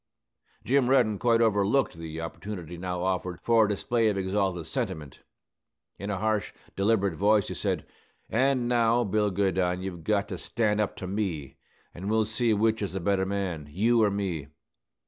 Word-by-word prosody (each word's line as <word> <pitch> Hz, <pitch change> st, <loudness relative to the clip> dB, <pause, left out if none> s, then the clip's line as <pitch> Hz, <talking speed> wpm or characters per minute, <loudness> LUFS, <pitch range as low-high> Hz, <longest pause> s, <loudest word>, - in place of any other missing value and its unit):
Jim 130 Hz, -1 st, +3 dB
Reddin 110 Hz, -6 st, +3 dB
quite 115 Hz, -1 st, +3 dB
overlooked 110 Hz, +3 st, +2 dB
the 80 Hz, -1 st, -7 dB
opportunity 90 Hz, 0 st, -6 dB
now 90 Hz, 0 st, -3 dB
offered 90 Hz, -1 st, -2 dB
for 115 Hz, -2 st, +4 dB
a -, -, -2 dB
display 115 Hz, +3 st, +1 dB
of 100 Hz, -, -1 dB
exalted 95 Hz, -3 st, -1 dB
sentiment. 75 Hz, -1 st, -4 dB, 0.8 s
In 100 Hz, -, -5 dB
a 100 Hz, -, -1 dB
harsh, 110 Hz, 0 st, -1 dB, 0.2 s
deliberate 100 Hz, -2 st, +2 dB
voice 105 Hz, +4 st, +2 dB
he -, -, -3 dB
said, -, -, -2 dB, 0.4 s
"An' 130 Hz, +1 st, +1 dB
now, 120 Hz, 0 st, +3 dB
Bill 105 Hz, 0 st, +1 dB
Goodine, 95 Hz, -2 st, 0 dB
you've 90 Hz, -4 st, -6 dB
got 100 Hz, +2 st, +1 dB
to -, -, -5 dB
stand 105 Hz, -2 st, 0 dB
up 105 Hz, -, -2 dB
to -, -, -6 dB
me, 90 Hz, -9 st, -3 dB, 0.4 s
an' 95 Hz, +3 st, -7 dB
we'll 110 Hz, 0 st, +2 dB
see 115 Hz, +2 st, 0 dB
which 110 Hz, +1 st, +2 dB
is 100 Hz, -, -3 dB
the 95 Hz, -, -2 dB
better 95 Hz, +1 st, +1 dB
man, 95 Hz, -6 st, -3 dB
you 115 Hz, +9 st, +2 dB
or 105 Hz, -, +4 dB
me. 95 Hz, -8 st, -3 dB
100 Hz, 170 wpm, -27 LUFS, 90-110 Hz, 0.8 s, for